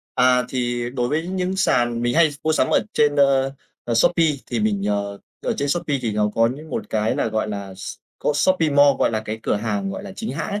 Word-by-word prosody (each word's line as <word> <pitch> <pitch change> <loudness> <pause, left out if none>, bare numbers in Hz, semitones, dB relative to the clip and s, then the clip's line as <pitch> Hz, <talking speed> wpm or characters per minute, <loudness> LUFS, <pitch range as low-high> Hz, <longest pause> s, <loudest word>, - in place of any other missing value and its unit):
À, 125 -1 +4
thì 120 -1 -2
đối 125 -1 -1
với 155 +4 -1
những 185 0 -2
sàn 120 -9 +1
mình 120 0 0
hay 165 -2 +5
mua 160 - +2
sắm - - +2
ở - - +4
trên, 145 -1 +2
ơ, 135 -1 +3 0.3
ờ, 120 - -1
Shopee 165 +8 +4 0.2
thì 120 -3 -2
mình, 100 -2 0
ờ 100 -1 -2 0.2
ở - - 0
trên 140 - -1
Shopee 145 -3 0
thì 115 -3 -1
nó 105 0 +1
có 115 0 +4
những 155 +1 -11
một - - -4
cái 110 0 0
là, - - 0
gọi 110 0 -1
là, 100 -2 -6
s 95 +1 -7 0.2
có 150 - 0
Shopee 165 -1 +2
Mall, 145 0 +6
gọi - - +2
là 110 -1 -2
cái 110 +1 -4
cửa - - 0
hàng, 105 -2 -2
gọi - - -6
là, 190 - -8
chính 220 +3 -5
hãng - - -4
ấy. 205 +1 -2
125 Hz, 250 wpm, -22 LUFS, 110-150 Hz, 0.3 s, Mall